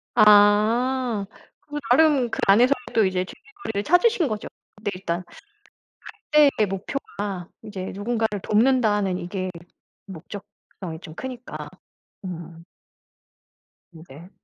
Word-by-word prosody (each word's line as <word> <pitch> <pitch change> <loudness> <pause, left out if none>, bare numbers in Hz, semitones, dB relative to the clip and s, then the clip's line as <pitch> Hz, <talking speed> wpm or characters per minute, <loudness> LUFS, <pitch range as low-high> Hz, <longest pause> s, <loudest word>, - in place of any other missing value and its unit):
아. 215 +2 +4 0.4
그 295 0 -5
나름 275 -3 +4
그 - - -4
안에서 240 +7 +6 0.2
또 220 -3 +5
이제 185 -1 0
즐길거리를 400 - -6
찾으신 355 - +3
거죠. 215 -2 -4 0.4
네. 205 - -1
일단 180 -1 -3 1.1
갈 300 -1 +7
때 215 - +4
목표가 195 +8 -4 0.6
이제 195 -3 -6
누군가를 220 0 -1
돕는다는 210 -5 +2
이게 185 +1 -4 0.6
목적성이 190 -2 -10
좀 160 -4 -10
크니까. 255 +1 -7 0.6
음. 170 -2 -8 1.3
음 160 - -12
네. 160 +7 -13
210 Hz, 215 characters per minute, -24 LUFS, 185-250 Hz, 1.3 s, 갈